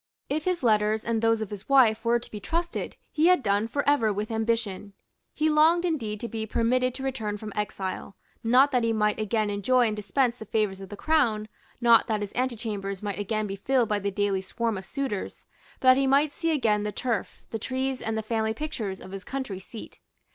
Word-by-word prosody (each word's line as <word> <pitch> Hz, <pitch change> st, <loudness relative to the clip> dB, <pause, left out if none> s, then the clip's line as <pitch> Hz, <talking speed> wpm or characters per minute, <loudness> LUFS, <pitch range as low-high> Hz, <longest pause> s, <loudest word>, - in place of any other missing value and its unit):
If 305 Hz, +2 st, -1 dB
his 365 Hz, -5 st, 0 dB
letters 215 Hz, -1 st, +2 dB
and 230 Hz, -1 st, 0 dB
those 225 Hz, -1 st, +2 dB
of 215 Hz, -, -4 dB
his 205 Hz, +3 st, -8 dB
wife 235 Hz, -5 st, +5 dB
were 235 Hz, 0 st, +3 dB
to 235 Hz, -, -10 dB
be 210 Hz, -, -6 dB
trusted, 340 Hz, +9 st, -3 dB, 0.2 s
he 315 Hz, +2 st, +3 dB
had 360 Hz, -6 st, +4 dB
done 205 Hz, +2 st, +1 dB
for 285 Hz, +5 st, -2 dB
ever 240 Hz, -7 st, +3 dB
with 210 Hz, +2 st, -3 dB
ambition. 220 Hz, -3 st, -2 dB, 0.4 s
He 310 Hz, -, 0 dB
longed 320 Hz, +3 st, +4 dB
indeed 230 Hz, -11 st, -2 dB
to 235 Hz, -, -3 dB
be 220 Hz, -1 st, -4 dB
permitted 250 Hz, +3 st, +1 dB
to 265 Hz, -, -6 dB
return 225 Hz, -6 st, -2 dB
from 210 Hz, 0 st, -8 dB
exile, 195 Hz, -2 st, -4 dB, 0.3 s
not 255 Hz, +5 st, +5 dB
that 250 Hz, -3 st, +2 dB
he 230 Hz, 0 st, +2 dB
might 210 Hz, -1 st, +1 dB
again 215 Hz, 0 st, 0 dB
enjoy 240 Hz, +5 st, +2 dB
and 215 Hz, -2 st, 0 dB
dispense 235 Hz, +5 st, 0 dB
the 220 Hz, -, -7 dB
favours 200 Hz, -2 st, -1 dB
of 195 Hz, -, -9 dB
the 205 Hz, -, -8 dB
Crown, 235 Hz, -9 st, +1 dB, 0.3 s
not 235 Hz, -1 st, +5 dB
that 215 Hz, -2 st, -1 dB
his 205 Hz, -1 st, -5 dB
antechambers 215 Hz, -6 st, -3 dB
might 205 Hz, -1 st, -3 dB
again 215 Hz, +1 st, -1 dB
be 195 Hz, -1 st, -4 dB
filled 245 Hz, +3 st, +1 dB
by 210 Hz, -1 st, +1 dB
the 200 Hz, 0 st, -1 dB
daily 200 Hz, -1 st, 0 dB
swarm 230 Hz, +3 st, -2 dB
of 190 Hz, -1 st, -6 dB
suitors, 265 Hz, -5 st, -4 dB, 0.3 s
but 255 Hz, -, +4 dB
that 255 Hz, -, +7 dB
he 270 Hz, 0 st, +2 dB
might 280 Hz, +2 st, +3 dB
see 330 Hz, -, -2 dB
again 230 Hz, -9 st, +2 dB
the 210 Hz, 0 st, -2 dB
turf, 235 Hz, 0 st, -3 dB
the 225 Hz, -, -3 dB
trees 260 Hz, +2 st, -2 dB
and 220 Hz, 0 st, -2 dB
the 220 Hz, -, -2 dB
family 220 Hz, 0 st, -1 dB
pictures 225 Hz, -10 st, -4 dB
of 185 Hz, -, -10 dB
his 195 Hz, 0 st, -7 dB
country 260 Hz, -9 st, -4 dB
seat. 215 Hz, +4 st, -10 dB
225 Hz, 220 wpm, -27 LUFS, 210-260 Hz, 0.4 s, that